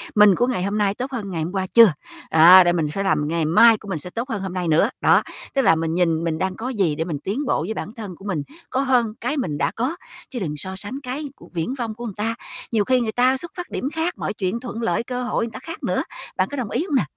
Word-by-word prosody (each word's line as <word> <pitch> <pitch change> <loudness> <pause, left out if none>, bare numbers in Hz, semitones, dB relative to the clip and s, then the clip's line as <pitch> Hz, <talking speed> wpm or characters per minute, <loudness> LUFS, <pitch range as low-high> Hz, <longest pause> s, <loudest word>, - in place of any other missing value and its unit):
mình 210 -2 +7
của 245 - +1
ngày 240 -8 -1
hôm 200 +2 -1
nay 205 -2 +2
tốt 255 +5 -5
hơn 215 -7 -4
ngày 165 -3 -2
hôm 165 - -4
qua 190 -1 -1
chưa. 230 -7 +8 0.4
Đó, 175 +4 +9
để 175 0 +2
mình 160 -3 0
sẽ 195 - -2
làm 150 -6 +1
ngày 165 0 0
mai 225 +8 +6
của 210 - -14
mình 165 - -2
sẽ 180 - -6
tốt 235 +7 -4
hơn 215 -5 -3
hôm 190 -2 -4
nay 180 -2 -2
nữa. 165 +8 +3
Đó, - - +5 0.3
tức 275 - +2
là 210 - +5
mình 160 0 -1
nhìn 165 -2 +1
mình 160 -2 -1
đang 190 +1 -2
có 250 +3 -4
gì 195 - 0
để 160 - -1
mình 155 -5 -4
tiến 235 +10 -2
bộ - - +1
với 190 +7 -3
bản 215 - -6
thân 210 -6 -7
của 195 - -14
mình, 175 -8 -2 0.3
có 265 - 0
hơn 250 -5 +2
cái 255 +6 -1
mình 165 - -2
đã - - 0
có, 255 +8 -1 0.3
chứ 250 - -5
đừng 155 -7 -3
so 190 +6 -4
sánh 210 +8 -4
cái 265 +4 -4
của - - -16
viển 170 +9 -2
vông 235 -5 -4
của 240 +2 -7
người 215 - -5
ta. 225 +2 -2 0.4
Nhiều 215 -3 +2
khi 255 +2 +3
người 220 -2 -1
ta 255 +3 +3
xuất 340 +5 -5
phát 355 - -5
điểm 270 - -3
khác, 325 +2 -1
mọi - - -3
chuyện 195 +3 -2
thuận 235 -2 -6
lợi, 230 - 0
cơ 250 +1 -4
hội 245 - -1
người 230 - -7
ta - - -8
khác 330 - -8
nữa. - - 0 0.3
Bạn - - +2
có 285 - -4
đồng 245 -6 -3
ý 265 - -1
hông 305 - -2
nè? 260 - +4
210 Hz, 295 wpm, -22 LUFS, 180-250 Hz, 0.4 s, Đó